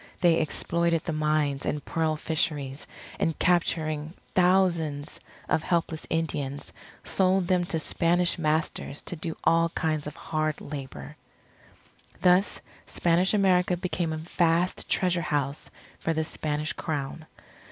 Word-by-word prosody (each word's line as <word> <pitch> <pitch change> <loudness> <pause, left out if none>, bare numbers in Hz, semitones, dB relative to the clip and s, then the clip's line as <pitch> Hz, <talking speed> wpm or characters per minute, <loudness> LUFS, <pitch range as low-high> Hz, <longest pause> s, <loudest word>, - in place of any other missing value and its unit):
They 170 -2 +5
exploited 170 +2 0
the 165 - -2
mines 150 -2 +1
and 150 -1 -2
pearl 160 -1 0
fisheries, 150 -3 -2 0.3
and, 165 - 0
capturing 160 -2 +1 0.2
thousands 170 -6 +2 0.3
of - - +2
helpless 165 -2 -1
Indians, 145 -4 -2 0.3
sold 190 -1 +2
them 180 -1 +2
to 175 -2 -1
Spanish 170 +2 +2
masters, 155 -2 -1
to - - -5
do 165 0 -5
all 165 0 +4
kinds 155 -3 -1
of 150 - -7
hard 155 -1 -2
labour. 130 - -7 1.0
Thus 180 +2 +3 0.3
Spanish 175 +4 +2
America 180 -3 +3
became 175 -2 -2
a 155 - -2
vast 170 +2 0
treasure 180 -2 +2
house 145 -2 -2 0.3
for 165 - 0
the 160 0 0
Spanish 150 -1 -2
Crown. 155 +1 -4
160 Hz, 125 wpm, -27 LUFS, 150-175 Hz, 1.0 s, They